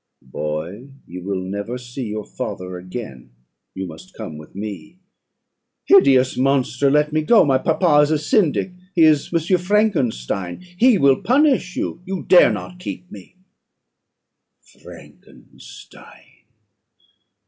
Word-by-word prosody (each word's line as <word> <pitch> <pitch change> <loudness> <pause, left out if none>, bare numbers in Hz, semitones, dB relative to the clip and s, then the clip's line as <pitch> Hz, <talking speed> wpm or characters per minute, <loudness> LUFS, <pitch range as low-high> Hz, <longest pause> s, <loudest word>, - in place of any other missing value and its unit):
"'Boy, 75 - -5 0.2
you 90 +1 -9
will 95 0 -3
never 100 +6 -5
see 125 0 -7
your 105 0 -5
father 90 0 -6
again; 90 - -8 0.5
you 95 - -4
must 80 -3 -12
come 80 - -7
with 75 +2 -13
me.' 100 - -7 0.9
"'Hideous 130 - +5
monster! 135 0 +1
let 150 +1 +2
me 155 - +2
go. 225 +8 +5
My 135 -2 +2
papa 160 0 +2
is 150 - +2
a 155 - +2
Syndic 185 - +1 0.2
he 165 - +5
is 155 -3 +3
M. 170 +2 +1
Frankenstein 160 - -1 0.2
he 245 -2 +5
will 140 -5 +3
punish 260 -8 +2
you. 170 - -4
You 190 -1 -5
dare 180 - +6
not 180 - -7
keep 90 - -8
me.' 100 - -13 1.5
"'Frankenstein! - - -16
130 Hz, 125 wpm, -20 LUFS, -, 1.5 s, dare